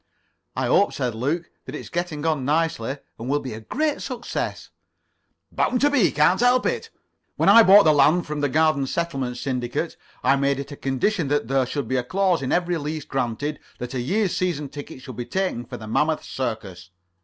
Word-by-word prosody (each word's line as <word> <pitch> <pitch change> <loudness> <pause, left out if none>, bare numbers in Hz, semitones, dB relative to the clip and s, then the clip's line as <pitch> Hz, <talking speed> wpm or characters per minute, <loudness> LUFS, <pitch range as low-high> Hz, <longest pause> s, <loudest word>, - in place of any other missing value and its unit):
"I - - -1
hope," 200 - +3
said 125 -4 -2
Luke, 145 +9 -2
"that - - -7
it's - - -8
getting 170 -3 -3
on 155 -4 +1
nicely, 145 -3 0 0.2
and 120 +3 -5
will 145 +1 +2
be 130 -5 -6
a 110 - -7
great 295 - -1
success." 250 -3 -4 0.8
"Bound 250 - +1
to 290 +1 +4
be. 240 - +4
Can't 150 +7 +3
help 245 +1 +4
it. - - -1 0.5
When - - +3
I 230 - +9
bought 205 -1 +8
the 155 - +5
land 150 +5 +4
from 150 -1 -4
the 145 - +1
Garden 155 -2 +2
Settlement 135 -7 -2
Syndicate 125 -1 -3 0.3
I 140 - +4
made 140 0 +1
it 140 +1 -6
a - - -6
condition 145 - 0
that 145 -4 0
there 135 -2 +2
should 140 +1 -3
be 130 - 0
a 125 - 0
clause 185 +4 +1
in 130 - -2
every 175 -1 +1
lease 150 0 -4
granted 135 +3 -2 0.2
that 125 +1 -6
a 130 - -1
year's 195 - 0
season 155 -6 -1
ticket 140 -2 -9
should 130 -4 -9
be 120 - -4
taken 185 -10 -2
for - - -8
the 110 - -9
Mammoth 150 +8 0
Circus." 105 -8 -5
145 Hz, 200 wpm, -23 LUFS, 130-175 Hz, 0.8 s, I